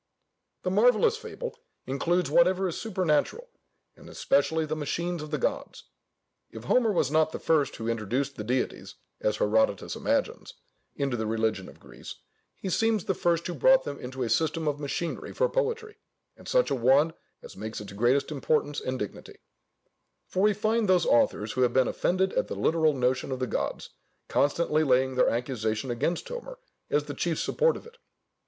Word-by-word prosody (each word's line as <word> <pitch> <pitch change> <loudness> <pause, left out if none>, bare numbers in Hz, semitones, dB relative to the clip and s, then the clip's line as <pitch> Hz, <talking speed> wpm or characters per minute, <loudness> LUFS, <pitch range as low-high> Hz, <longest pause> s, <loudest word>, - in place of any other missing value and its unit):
The 185 - -1
marvellous 245 - +4
fable 475 +2 -7 0.3
includes 165 +6 0
whatever 185 +4 +4
is 170 - -4
supernatural, 190 - -1 0.5
and - - -14
especially 160 - +1
the 155 0 -3
machines 170 +3 -3
of 155 - -7
the 150 - -1
gods. - - -3 0.7
If 110 - -10
Homer 230 - +3
was 150 -8 +1
not 155 0 +3
the - - -4
first 155 -3 +1
who 115 - -5
introduced 115 +5 -2
the 105 - -5
deities 125 +4 -2 0.2
(as 105 0 0
Herodotus 105 -2 +1
imagines) - - -2 0.4
into 135 -3 -1
the 110 -1 -2
religion 110 -3 -1
of - - -16
Greece, - - -11 0.4
he - - -7
seems 220 +1 +1
the 190 - +1
first 170 -1 0
who 175 - -3
brought 265 +9 +5
them 140 -1 -6
into 130 +1 -5
a 115 - -2
system 160 0 0
of 145 -1 -1
machinery 150 +3 -4
for - - +2
poetry, 460 -3 -2 0.4
and - - -15
such - - +2
a - - +2
one 135 +6 +3 0.3
as - - -11
makes 110 +2 -6
its 105 -1 -9
greatest 120 +8 +1
importance 145 0 0
and 130 0 -3
dignity: 105 -5 -7 0.9
for 185 - -2
we 210 +1 +4
find 215 0 +1
those 180 -3 +4
authors 265 - +2
who 130 - -2
have 125 -1 +3
been 130 -1 +3
offended 190 +1 0
at - - 0
the - - -5
literal 160 -2 +2
notion 130 +1 0
of 130 - -2
the 130 - -1
gods, - - -3 0.4
constantly 155 +2 +1
laying 130 -1 +2
their 125 - +3
accusation 115 -1 -2
against 140 +9 -1
Homer - - -7 0.3
as - - +1
the - - -6
chief - - -1
support 480 0 +1
of - - -13
it. 475 0 -16
155 Hz, 180 wpm, -27 LUFS, 125-190 Hz, 0.9 s, brought